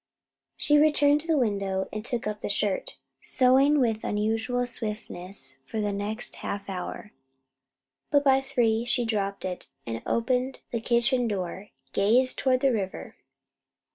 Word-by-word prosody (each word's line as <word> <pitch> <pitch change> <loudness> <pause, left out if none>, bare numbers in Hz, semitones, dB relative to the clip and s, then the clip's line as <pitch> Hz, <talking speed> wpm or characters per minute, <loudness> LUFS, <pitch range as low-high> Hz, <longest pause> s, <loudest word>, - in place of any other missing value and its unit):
She 295 0 +4
returned 295 -1 +4
to 325 - -11
the 320 -2 +3
window 200 -5 0
and 215 0 -4
took 240 0 -3
up 210 0 -3
the - - -3
shirt, 200 -1 -1 0.2
sewing 270 +3 +4
with 225 -4 +1
unusual 225 +4 0
swiftness 210 - -7
for 220 - -3
the 205 -1 0
next 210 +4 -5
half 200 0 -5
hour; 195 +2 -6 1.0
but 285 -1 +3
by 270 -1 +5
three 235 -4 +1
she 240 0 +1
dropped 200 -3 -2
it, 180 -1 -5 0.2
and 115 0 -4
opening 250 +2 0 0.2
the 235 - -2
kitchen 240 +1 +2
door, 190 -1 -4 0.2
gazed 245 +6 +3
toward 255 -1 +2
the 275 -1 +4
river. 195 -4 -4
225 Hz, 145 wpm, -27 LUFS, 205-255 Hz, 1.0 s, by